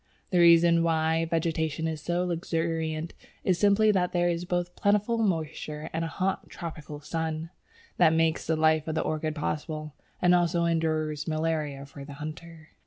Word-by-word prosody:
The 180 Hz, -, +3 dB
reason 170 Hz, 0 st, +6 dB
why 160 Hz, 0 st, +1 dB
vegetation 160 Hz, -1 st, -1 dB
is 160 Hz, -2 st, -4 dB
so 175 Hz, +2 st, -1 dB
luxuriant 165 Hz, -2 st, -2 dB, 0.3 s
is 180 Hz, -2 st, +1 dB
simply 205 Hz, +2 st, +4 dB
that 180 Hz, -3 st, 0 dB
there 175 Hz, 0 st, +2 dB
are 170 Hz, +1 st, -3 dB
both 175 Hz, 0 st, -1 dB
plentiful 210 Hz, +3 st, +1 dB
moisture 155 Hz, -6 st, -2 dB
and 165 Hz, +1 st, -1 dB
a -, -, -1 dB
hot, 190 Hz, +3 st, -2 dB
tropical 150 Hz, -3 st, -7 dB
sun. 160 Hz, +1 st, -3 dB, 0.5 s
That 160 Hz, -, +5 dB
makes 160 Hz, 0 st, +1 dB
the 160 Hz, -, +2 dB
life 155 Hz, 0 st, +2 dB
of 160 Hz, -, -2 dB
the -, -, +1 dB
orchid 155 Hz, 0 st, -2 dB
possible, 155 Hz, 0 st, -4 dB, 0.3 s
and 180 Hz, 0 st, +4 dB
also 170 Hz, -1 st, +2 dB
ensures 155 Hz, -2 st, 0 dB
malaria 155 Hz, -3 st, -2 dB
for 140 Hz, 0 st, -11 dB
the 140 Hz, +1 st, -9 dB
hunter. 155 Hz, +2 st, -9 dB
165 Hz, 165 wpm, -28 LUFS, 155-175 Hz, 0.5 s, reason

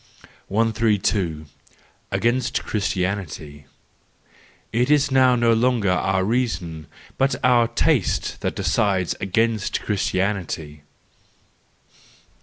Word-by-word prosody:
132. 105 Hz, -7 st, 0 dB, 0.6 s
Against 120 Hz, +2 st, 0 dB
Christianity. 90 Hz, -8 st, -3 dB, 1.1 s
—It 120 Hz, +3 st, +1 dB
is 145 Hz, -1 st, +3 dB
now 130 Hz, -1 st, +5 dB
no 120 Hz, -1 st, +3 dB
longer 115 Hz, -4 st, +2 dB
our 95 Hz, +1 st, +1 dB
reason, 95 Hz, -, -2 dB, 0.3 s
but 135 Hz, +1 st, +2 dB
our 120 Hz, -2 st, +4 dB
taste 120 Hz, -, 0 dB
that -, -, -2 dB
decides 95 Hz, -3 st, +1 dB
against 110 Hz, +2 st, 0 dB
Christianity. 95 Hz, -7 st, -2 dB
105 Hz, 80 wpm, -22 LUFS, 90-120 Hz, 1.1 s, now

